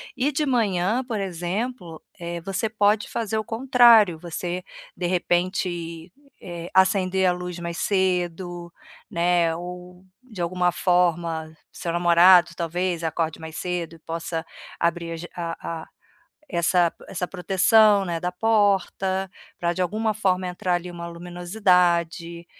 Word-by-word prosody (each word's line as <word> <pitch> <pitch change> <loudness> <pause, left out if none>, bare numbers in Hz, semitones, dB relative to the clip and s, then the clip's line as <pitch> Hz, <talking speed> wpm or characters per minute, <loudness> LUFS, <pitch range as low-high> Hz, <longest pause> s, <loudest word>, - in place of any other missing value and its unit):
E 265 +4 +1
de 300 +2 0
manhã, 220 -3 +1
por 235 -4 -3
exemplo, 180 0 -4 0.2
eh, 170 0 -5
você 195 +4 -2
pode 210 0 +2
fazer 220 -1 -2
o 215 - -3
contrário, 230 -6 +5
você 175 +1 -4 0.3
de 180 - -2
repente, 175 -1 -1 0.3
eh, 175 -1 -7
acender 190 0 +3
a 180 - +4
luz 180 0 -5
mais 170 -1 -5
cedo, 175 -2 -1 0.4
né, 170 -3 +2
ou 180 +1 -9 0.2
de 215 -8 -8
alguma 180 +1 +1
forma 170 -2 +1 0.2
seu 170 - -4
namorado 175 +1 +6
talvez 175 +1 -2
acorde 160 0 -2
mais 160 0 -9
cedo 175 -2 -3
e 165 - -17
possa 165 0 -4 0.3
abrir 170 0 -1
a - - -4
ja 175 - -7
a 165 -1 -5
a, - - -12 0.6
essa 170 -1 +2 0.2
essa 180 -1 -3
proteção, 195 +3 +4
né, 170 -2 -3
da 180 +1 -1
porta 195 -2 +1 0.3
pra 170 0 0
de 185 - -5
alguma 215 +5 0
forma 185 -3 0
entrar 180 0 -1
ali 175 +1 -3
uma 170 -1 -7
luminosidade, 175 -1 0
180 Hz, 140 wpm, -24 LUFS, 170-195 Hz, 0.6 s, namorado